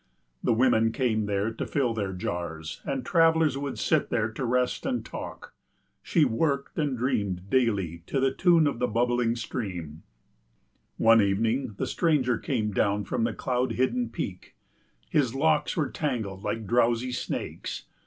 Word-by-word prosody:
The -, -, +2 dB
women 115 Hz, -1 st, +3 dB
came 110 Hz, -4 st, 0 dB
there 100 Hz, +2 st, 0 dB
to 115 Hz, -, -5 dB
fill 130 Hz, -5 st, 0 dB
their 100 Hz, -4 st, -2 dB
jars, 85 Hz, -3 st, -5 dB
and 135 Hz, -2 st, -3 dB
travellers 160 Hz, -3 st, +4 dB
would 140 Hz, -3 st, -4 dB
sit -, -, +1 dB
there 110 Hz, 0 st, 0 dB
to 115 Hz, -, -5 dB
rest 125 Hz, +1 st, 0 dB
and 260 Hz, -2 st, -2 dB
talk. -, -, -8 dB, 0.5 s
She 165 Hz, -5 st, +3 dB
worked 140 Hz, +5 st, -1 dB
and 145 Hz, -4 st, 0 dB
dreamed 100 Hz, -7 st, -1 dB
daily 100 Hz, -10 st, +1 dB
to 135 Hz, -, 0 dB
the 135 Hz, 0 st, +2 dB
tune 170 Hz, -2 st, +4 dB
of 140 Hz, -5 st, -1 dB
the 125 Hz, -, +1 dB
bubbling 120 Hz, +1 st, +1 dB
stream. 90 Hz, -, -5 dB, 1.0 s
One 115 Hz, 0 st, +6 dB
evening 110 Hz, +4 st, 0 dB
the -, -, -1 dB
stranger 135 Hz, -9 st, +1 dB
came 110 Hz, -6 st, -1 dB
down 100 Hz, +1 st, +1 dB
from 115 Hz, -, 0 dB
the 115 Hz, -, -1 dB
cloud 125 Hz, -1 st, -1 dB
hidden 240 Hz, -, 0 dB
peak; -, -, -6 dB, 0.5 s
his 140 Hz, -8 st, +1 dB
locks 150 Hz, +3 st, +2 dB
were 145 Hz, -5 st, 0 dB
tangled 110 Hz, -10 st, -3 dB
like 115 Hz, -1 st, -2 dB
drowsy 120 Hz, +3 st, +2 dB
snakes. 125 Hz, -, -4 dB
120 Hz, 155 wpm, -27 LUFS, 105-135 Hz, 1.0 s, One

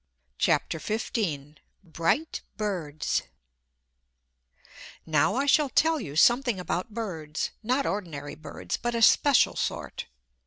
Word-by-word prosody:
CHAPTER 165 Hz, -, +1 dB
XV 160 Hz, -, -3 dB, 0.3 s
Bright 165 Hz, -, -1 dB, 0.2 s
Birds 175 Hz, -8 st, -2 dB, 1.8 s
Now 160 Hz, +6 st, +2 dB
I 275 Hz, +2 st, +1 dB
shall 285 Hz, 0 st, +4 dB
tell 320 Hz, +3 st, +3 dB
you 145 Hz, -, -7 dB
something 240 Hz, -, +4 dB
about 180 Hz, +3 st, -3 dB
birds; 160 Hz, -9 st, -3 dB
not 255 Hz, +5 st, 0 dB
ordinary 160 Hz, -8 st, -4 dB
birds, 155 Hz, -, -5 dB
but 240 Hz, 0 st, -2 dB
a 230 Hz, -, +1 dB
special 280 Hz, +4 st, +5 dB
sort. -, -, -4 dB
205 Hz, 110 wpm, -27 LUFS, 155-245 Hz, 1.8 s, special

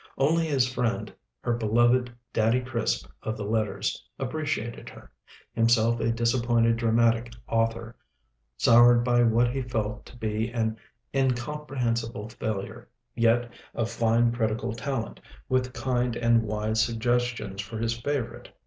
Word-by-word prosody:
Only 165 Hz, +4 st, +2 dB
his 135 Hz, -5 st, +2 dB
friend, 125 Hz, -2 st, -2 dB, 0.3 s
her 120 Hz, -, 0 dB
beloved 120 Hz, +2 st, +2 dB, 0.2 s
"Daddy 115 Hz, +2 st, +3 dB
Crisp" 115 Hz, -, -1 dB, 0.2 s
of 110 Hz, 0 st, -3 dB
the 105 Hz, -, -4 dB
letters, 110 Hz, -1 st, -1 dB
appreciated 130 Hz, -4 st, -3 dB
her; -, -, -14 dB, 0.4 s
himself 115 Hz, 0 st, +3 dB
a 115 Hz, -, +1 dB
disappointed 115 Hz, 0 st, +2 dB
dramatic 115 Hz, 0 st, +2 dB, 0.2 s
author, 115 Hz, 0 st, -1 dB, 0.6 s
soured 120 Hz, -, +6 dB
by 120 Hz, 0 st, +3 dB
what 120 Hz, +1 st, +3 dB
he 135 Hz, +1 st, -2 dB
felt 110 Hz, -4 st, -3 dB
to 120 Hz, -, -14 dB
be 110 Hz, 0 st, -2 dB
an 110 Hz, -2 st, -1 dB, 0.4 s
incomprehensible 125 Hz, -4 st, -1 dB
failure, 105 Hz, -3 st, -5 dB, 0.2 s
yet 120 Hz, +1 st, +2 dB, 0.2 s
of 115 Hz, -1 st, -1 dB
fine 115 Hz, +1 st, +2 dB
critical 115 Hz, 0 st, -1 dB
talent, 120 Hz, 0 st, -4 dB, 0.3 s
with 130 Hz, 0 st, 0 dB
kind 125 Hz, -2 st, -1 dB
and 115 Hz, -1 st, +3 dB
wise 110 Hz, 0 st, 0 dB
suggestions 120 Hz, -3 st, -1 dB
for 110 Hz, +2 st, -7 dB
his 115 Hz, +1 st, 0 dB
favorite 130 Hz, +1 st, -3 dB
Fanny. -, -, -24 dB
115 Hz, 130 wpm, -27 LUFS, 115-125 Hz, 0.6 s, soured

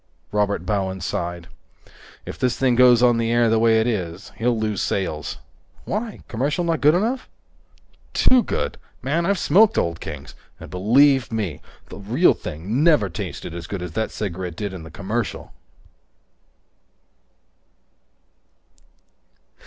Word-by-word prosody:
Robert 100 Hz, -4 st, 0 dB
Bowen 95 Hz, -1 st, -1 dB
sighed. 85 Hz, -1 st, -4 dB, 0.8 s
"If -, -, -8 dB
this 125 Hz, -1 st, 0 dB
thing 130 Hz, -2 st, +2 dB
goes 125 Hz, -1 st, +6 dB
on 120 Hz, -1 st, +4 dB
the 115 Hz, 0 st, 0 dB
air 120 Hz, -1 st, +3 dB
the 115 Hz, -, +3 dB
way 110 Hz, 0 st, +4 dB
it 110 Hz, -, +1 dB
is, 95 Hz, -5 st, -3 dB
he'll 115 Hz, +1 st, 0 dB
lose 110 Hz, -2 st, -1 dB
sales." 80 Hz, -6 st, -2 dB, 0.5 s
"Why? 220 Hz, +1 st, -4 dB
Commercial 140 Hz, +9 st, -1 dB
not 165 Hz, -2 st, 0 dB
good 150 Hz, +3 st, +5 dB
enough?" 235 Hz, +8 st, -1 dB, 0.9 s
"Too 255 Hz, -1 st, +5 dB
good! -, -, -3 dB, 0.2 s
Man, 160 Hz, +7 st, 0 dB
I've 200 Hz, 0 st, +2 dB
smoked 205 Hz, +8 st, +4 dB
Old 85 Hz, 0 st, 0 dB
Kings, 75 Hz, -2 st, -8 dB, 0.3 s
and, -, -, -11 dB
believe 130 Hz, +8 st, +4 dB
me, 100 Hz, -10 st, -3 dB, 0.3 s
the -, -, -9 dB
real 120 Hz, -, +3 dB
thing 100 Hz, -, -3 dB
never 150 Hz, -, +4 dB
tasted 80 Hz, -, -6 dB
as 85 Hz, 0 st, -7 dB
good 95 Hz, -3 st, -5 dB
as 90 Hz, -, -6 dB
that 110 Hz, +5 st, -2 dB
cigarette 90 Hz, -4 st, -5 dB
did 100 Hz, 0 st, -4 dB
in 90 Hz, -, -7 dB
the 80 Hz, -, -10 dB
commercial!" 105 Hz, +5 st, -4 dB
110 Hz, 140 wpm, -22 LUFS, 95-135 Hz, 0.9 s, goes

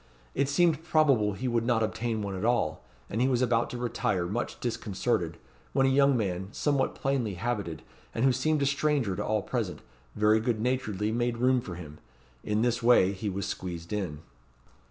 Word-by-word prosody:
It 140 Hz, -, +1 dB
seemed 160 Hz, 0 st, +3 dB
probable 140 Hz, -11 st, +3 dB
he 125 Hz, +7 st, -3 dB
would 120 Hz, -2 st, +1 dB
not 115 Hz, -1 st, +2 dB
obtain 110 Hz, 0 st, -2 dB
one 100 Hz, -1 st, -3 dB
at 95 Hz, -, -4 dB
all; 115 Hz, -10 st, +1 dB, 0.2 s
and 110 Hz, -, -2 dB
he 130 Hz, -, +4 dB
was 130 Hz, -1 st, +2 dB
about 120 Hz, -1 st, +2 dB
to 125 Hz, -, -5 dB
retire, 105 Hz, -6 st, -1 dB
much 105 Hz, +7 st, -3 dB
disconcerted, 110 Hz, -6 st, -1 dB, 0.4 s
when 135 Hz, -1 st, +3 dB
a 135 Hz, -, +3 dB
young 140 Hz, -1 st, +4 dB
man 95 Hz, -4 st, -2 dB
somewhat 140 Hz, +1 st, 0 dB
plainly 130 Hz, -7 st, -1 dB
habited, 100 Hz, -6 st, -3 dB, 0.3 s
and 115 Hz, -, 0 dB
who 135 Hz, -, +5 dB
seemed 145 Hz, +3 st, +1 dB
a -, -, +2 dB
stranger 140 Hz, -7 st, +1 dB
to -, -, -2 dB
all 110 Hz, -1 st, 0 dB
present, -, -, -3 dB, 0.3 s
very 105 Hz, +1 st, +4 dB
good 115 Hz, -1 st, -1 dB
naturedly 110 Hz, -4 st, -1 dB
made 120 Hz, +1 st, 0 dB
room 125 Hz, +1 st, +3 dB
for 90 Hz, -6 st, -7 dB
him. 75 Hz, -4 st, -10 dB, 0.4 s
In 105 Hz, +1 st, 0 dB
this 120 Hz, 0 st, +1 dB
way 115 Hz, -5 st, +5 dB
he 100 Hz, +2 st, -3 dB
was 100 Hz, +1 st, -3 dB
squeezed 85 Hz, 0 st, -5 dB
in. 90 Hz, -8 st, -3 dB
115 Hz, 190 wpm, -28 LUFS, 100-130 Hz, 0.4 s, who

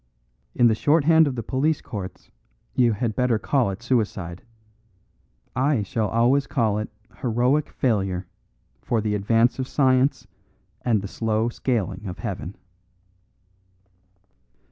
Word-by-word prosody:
In 120 Hz, -, +4 dB
the 115 Hz, -, +6 dB
short 145 Hz, +7 st, +2 dB
hand 160 Hz, +1 st, +5 dB
of 135 Hz, -, -2 dB
the 115 Hz, -, -4 dB
police 145 Hz, +7 st, 0 dB
courts, 100 Hz, -4 st, -8 dB, 0.4 s
you 120 Hz, -3 st, +3 dB
had 110 Hz, +1 st, -2 dB
better 125 Hz, -3 st, +2 dB
call 130 Hz, 0 st, +1 dB
it 95 Hz, +4 st, -6 dB
suicide. 105 Hz, -8 st, -1 dB, 1.1 s
I 130 Hz, -3 st, +2 dB
shall 105 Hz, +2 st, -1 dB
always 125 Hz, +6 st, +2 dB
call 110 Hz, -6 st, +1 dB
it 105 Hz, -, -4 dB, 0.3 s
heroic 125 Hz, +4 st, +1 dB
failure 95 Hz, -7 st, -1 dB, 0.6 s
for 115 Hz, -, 0 dB
the 105 Hz, -1 st, -1 dB
advance 115 Hz, +5 st, +2 dB
of 130 Hz, -, -2 dB
science 130 Hz, 0 st, +2 dB, 0.6 s
and 110 Hz, -5 st, +1 dB
the -, -, -4 dB
slow 110 Hz, +2 st, -1 dB
scaling 105 Hz, -6 st, -2 dB
of 90 Hz, -, -6 dB
heaven." 90 Hz, +5 st, -5 dB
115 Hz, 130 wpm, -24 LUFS, 105-130 Hz, 1.1 s, the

